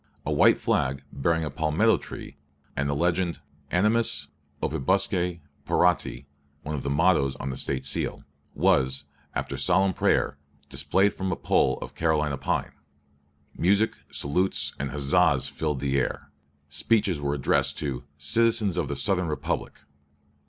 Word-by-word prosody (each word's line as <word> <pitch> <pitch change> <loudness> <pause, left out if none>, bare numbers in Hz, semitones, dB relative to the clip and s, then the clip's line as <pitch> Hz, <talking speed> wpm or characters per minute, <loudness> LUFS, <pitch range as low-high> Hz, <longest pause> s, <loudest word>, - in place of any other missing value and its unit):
A - - -1
white - - +5
flag, 65 +1 0
bearing 80 +4 +1
a 75 - -4
palmetto 75 +2 +2
tree - - -9 0.4
and 70 +1 -1
the 70 - 0
legend 85 +2 0 0.3
Animis 110 +6 +2 0.3
opibusque 90 +3 0 0.2
parati 90 -5 +1 0.4
(one 75 - -4
of 70 - -2
the 70 - -3
mottoes 70 -3 +3
on 65 +1 -4
the - - -5
State 65 -1 -1
seal), 70 - -1 0.3
was, 65 +1 +2 0.3
after - - -3
solemn 95 +2 +2
prayer, - - +1 0.3
displayed 100 +2 +2
from 95 -1 -3
a - - 0
pole - - +2
of - - -9
Carolina 75 -4 0
pine. - - -1 0.8
Music, 100 +5 +2
salutes, 90 +7 0
and 70 0 -2
huzzahs 70 -1 +2
filled 75 -4 -2
the 70 -1 +1
air. 65 - -3 0.4
Speeches 90 +3 +1
were 70 0 0
addressed 70 - +1
to 70 -5 -3
"citizens 105 +5 +2
of 85 - 0
the 70 - -3
Southern 90 +2 +1
Republic." 75 - -3
75 Hz, 140 wpm, -26 LUFS, 70-90 Hz, 0.8 s, white